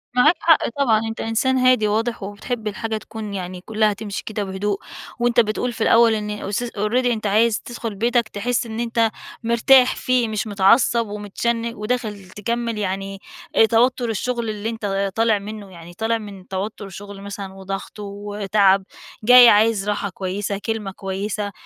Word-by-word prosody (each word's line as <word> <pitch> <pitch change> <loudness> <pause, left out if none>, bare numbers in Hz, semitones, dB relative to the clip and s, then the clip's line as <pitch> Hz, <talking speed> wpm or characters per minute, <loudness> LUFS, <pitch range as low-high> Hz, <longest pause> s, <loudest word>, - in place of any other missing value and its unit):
معاك 300 +7 +5
حق 325 -2 +4
طبعًا، 235 -4 +2
أنت 225 - -5
انسان 240 +4 +1
هادي 255 -4 +4
وواضح، 225 +1 -1
وبتحب 215 +3 -5
الحاجة 220 +1 -3
تكون 215 -1 -7
يعني 180 -1 -5
كلها 215 +1 +1
تمشي 205 -1 -6
كده 210 -1 -3
بهدوء، 195 +1 -2 0.4
وأنت 240 0 +3
بتقُول 235 +2 0
في 225 - -9
الأول 230 0 +5
إن 210 -1 -3
اس 210 +2 -3
already 230 +2 -1
أنت 225 -3 0
عايز 215 +2 +3
تدخل 235 -3 -6
بيتك 235 +2 +1
تحس 240 +4 -1
إن 225 0 -6
أنت 230 -1 +1 0.3
مرتاح 250 +3 +5
فيه، 250 -2 +1
مش 215 0 -2
متعصب 225 +3 +3
ومتشن 230 +3 -2
وداخل 210 -3 -3
تكمل 230 +3 -3
يعني 195 -1 -3 0.4
آآ، 225 - +7
توتر 240 +2 +2
الشغل 235 +1 -2
اللي 215 +1 -3
أنت 200 -3 -2
طالع 225 -2 +3
منه 205 -1 -8
يعني 170 -1 -12
طالع 225 +5 0
من 200 -4 -10
توتر 195 +1 -5
شغل 200 +1 -9
مثلًا 200 -1 -7
وضغط 195 +2 -7
وتعب 200 -1 +1 0.4
جاي 245 +1 +9
عايز 210 -1 +3
راحة 205 -1 -1
كويسة، 195 +2 -3
كلمة 225 -3 -2
كويسة، 200 +2 -4
215 Hz, 160 wpm, -21 LUFS, 200-230 Hz, 0.4 s, جاي